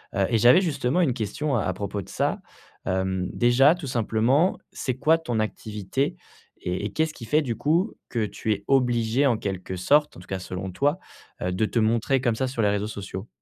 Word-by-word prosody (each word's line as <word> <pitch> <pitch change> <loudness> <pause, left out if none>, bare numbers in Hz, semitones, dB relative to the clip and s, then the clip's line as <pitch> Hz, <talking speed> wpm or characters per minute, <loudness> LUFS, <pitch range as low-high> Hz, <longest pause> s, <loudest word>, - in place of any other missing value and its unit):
Heu 100 -2 +2
et 115 - +2
j'avais 120 - +6
justement 145 -2 0
une 145 -8 +2
question 130 +6 -2
à 95 -4 0
propos 100 +1 -4
de - - -13
ça. - - -1 0.5
Hem, 95 -1 -1
déjà 130 +6 +5
tout 170 -5 -7
simplement, 125 - +2
c'est 130 - -3
quoi 155 +4 +4
ton 125 -9 -2
activité? 110 +4 -2 0.5
Et 90 +3 -2
et 105 - -4
qu'est-ce 160 0 0
qui 115 - -9
fait 150 +7 +3
du 120 -6 -3
coup 170 +8 +1 0.2
que 115 -3 0
tu 110 +1 -2
es 100 0 -6
obligée 125 -1 +2
en 120 -4 +2
quelque 95 -2 -4
sorte, 145 +12 +2
en - - -11
tout - - -16
cas 95 - -3
selon 95 +1 -5
toi, 145 - +1 0.4
heu, 90 - -1
de 95 +4 +1
te 115 - 0
montrer 115 +4 +2
comme 120 -3 +1
ça 130 +3 -1
sur 125 -2 -2
les 105 - +3
réseaux 100 +1 -1
sociaux? 100 -1 -7
115 Hz, 210 wpm, -25 LUFS, 100-140 Hz, 0.5 s, j'avais